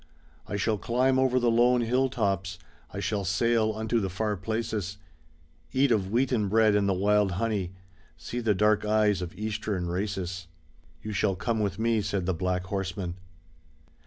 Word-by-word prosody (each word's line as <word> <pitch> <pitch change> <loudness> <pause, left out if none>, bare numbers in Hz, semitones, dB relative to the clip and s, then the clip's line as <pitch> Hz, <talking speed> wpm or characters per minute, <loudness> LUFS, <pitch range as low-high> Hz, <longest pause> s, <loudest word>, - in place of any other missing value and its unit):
I - - -4
shall 105 +1 0
climb 130 +4 +2
over 130 -1 +3
the 120 -1 +2
lone 120 +1 +4
hill 125 +3 +1
tops, 95 -6 -1 0.3
I 100 - -5
shall 100 0 -1
sail 110 +4 +2
unto 110 +2 0
the 95 -3 -2
far 105 +3 -1
places. 105 -1 -3 0.8
Eat 135 0 +3
of 100 -4 +1
wheaten 120 -2 +1
bread 110 0 +4
and 100 -1 +2
the - - +3
wild 100 0 +2
honey, 100 -2 -1 0.4
See 120 +9 -5
the 110 -4 +1
dark 105 +2 +3
eyes 105 -2 +2
of 90 0 -6
Eastern 105 -3 -2
races. 90 -1 -3 0.6
"You 110 - -4
shall 100 0 +1
come 115 +4 -1
with 100 -3 -1
me," 115 -1 +1
said 100 -2 -2
the 95 - +1
black 90 +2 -1
horseman. 95 -1 -3
105 Hz, 165 wpm, -27 LUFS, 95-115 Hz, 0.8 s, lone